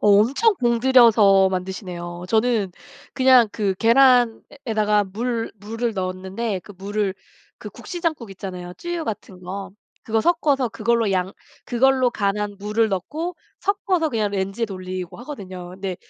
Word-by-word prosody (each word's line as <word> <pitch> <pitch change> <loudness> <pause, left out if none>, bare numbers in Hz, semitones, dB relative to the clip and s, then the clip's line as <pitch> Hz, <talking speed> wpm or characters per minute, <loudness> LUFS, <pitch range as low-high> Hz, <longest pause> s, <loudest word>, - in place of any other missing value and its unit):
엄청 235 - +4
공들여서 230 -5 +5
만드시네요. 180 -2 -5
저는 220 -2 +1 0.4
그냥 255 -4 +6
그 200 -3 0
계란에다가 230 -2 +3
물 225 +4 -3
물을 225 +3 -3
넣었는데 190 +2 -3
그 205 - -13
물을 200 0 -2 0.4
그 - - -8
국시 350 - -8
장국 310 - -2
있잖아요. 180 -2 -7
쯔유 345 - -4
같은 200 -6 -6
거. 190 +2 -6 0.3
그거 225 0 0
섞어서 290 -5 +2
그걸로 230 -1 0
양 185 0 0 0.3
그걸로 255 0 +3
간한 205 -1 -2
물을 215 +2 +1
넣고 305 - -3 0.3
섞어서 375 -4 0
그냥 220 -6 -1
레인지에 195 +3 -2
돌리고 185 -2 -6
하거든요. 185 -9 -8
네 190 -2 -3
215 Hz, 300 characters per minute, -22 LUFS, 190-245 Hz, 0.4 s, 그냥